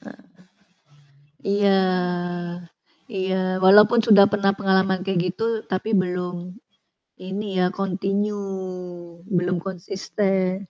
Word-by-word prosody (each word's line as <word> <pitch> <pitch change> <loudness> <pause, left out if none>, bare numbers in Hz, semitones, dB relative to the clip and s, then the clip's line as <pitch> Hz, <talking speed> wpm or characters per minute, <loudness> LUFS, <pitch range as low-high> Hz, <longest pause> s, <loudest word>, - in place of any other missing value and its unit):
Heeh. - - -13 1.3
Iya, 200 -1 +3 1.3
iya. 190 -2 -2 0.3
Walaupun 210 +5 +7
sudah 200 -2 +8
pernah 200 -1 +2
pengalaman 190 -1 +1
kayak 190 -2 0
gitu 225 - -3 0.2
tapi 185 +3 -3
belum 180 -1 -3 0.6
ini 190 +1 -5
ya 180 - +3
kontinyu, 195 +2 -2 0.8
belum 180 -2 0
konsisten. 190 +1 -2
195 Hz, 90 wpm, -23 LUFS, 185-200 Hz, 1.3 s, sudah